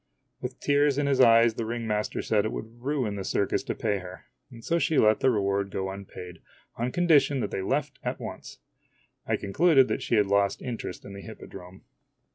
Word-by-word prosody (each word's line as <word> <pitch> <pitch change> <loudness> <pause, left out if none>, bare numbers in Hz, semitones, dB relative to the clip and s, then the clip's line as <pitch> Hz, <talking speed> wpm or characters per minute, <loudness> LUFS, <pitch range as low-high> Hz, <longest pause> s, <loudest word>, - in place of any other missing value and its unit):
With 125 0 -6
tears 145 -1 +2
in 145 - +1
his 135 -2 +3
eyes 115 -1 +6
the 115 - -4
ring 115 0 -3
master 105 -1 -2
said 105 -2 +2
it 110 - -2
would 115 +2 -8
ruin 130 -6 -1
the 95 - -4
circus 100 +1 0
to - - -3
pay 105 -3 -1
her, 90 0 -11 0.2
and 115 -2 -13
so 170 0 +1
she 160 -2 +1
let 110 0 +4
the 130 - +3
reward 100 -3 0
go 95 0 -3
unpaid, 90 -2 -10 0.3
on 120 +2 -2
condition 145 -5 +3
that 100 - -3
they - - -2
left 135 +10 -2
at - - -3
once. - - -8 0.7
I - - +2
concluded 135 - +3
that - - -1
she - - 0
had 105 -2 +4
lost 100 0 +1
interest 120 -7 -6
in 100 - -9
the 100 - -8
hippodrome. 90 -1 -11
115 Hz, 205 wpm, -27 LUFS, 100-135 Hz, 0.7 s, eyes